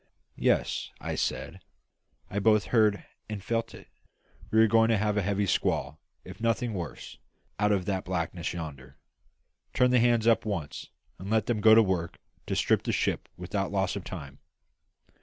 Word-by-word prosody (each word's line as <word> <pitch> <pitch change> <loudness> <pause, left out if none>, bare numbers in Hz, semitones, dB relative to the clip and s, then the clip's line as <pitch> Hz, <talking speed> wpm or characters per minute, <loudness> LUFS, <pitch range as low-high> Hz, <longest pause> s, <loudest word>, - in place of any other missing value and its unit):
"Yes," - - +1 0.3
said - - -3 0.7
I, 100 - -6
"I - - +3
both 105 0 +4
heard 110 -3 +3 0.2
and 105 -3 -5
felt 115 +1 -2
it. - - -14 0.6
We 110 - +3
are 115 - +6
going 115 +1 +4
to 115 - +3
have 105 0 0
a 105 - +2
heavy 100 +1 0
squall, 75 -5 0 0.3
if - - -11
nothing 115 0 0
worse, 85 -5 -7 0.4
out 105 0 +3
of 95 -3 +1
that 95 -1 -2
blackness 85 -2 -3
yonder. 70 -6 -8 0.8
Turn 125 0 +4
the 125 - +5
hands 120 -1 +3
up 115 -1 +5
at - - -22
once, 85 -9 -4 0.3
and 95 +2 -7
let 110 0 +2
them 115 -3 -1
go 110 +1 +8
to 115 - +7
work 90 -4 -2 0.3
to - - -1
strip - - +2
the - - -2
ship - - -1
without 95 +2 -3
loss 95 -1 0
of 100 - -5
time. 70 -8 -8
100 Hz, 175 wpm, -28 LUFS, 90-110 Hz, 0.8 s, go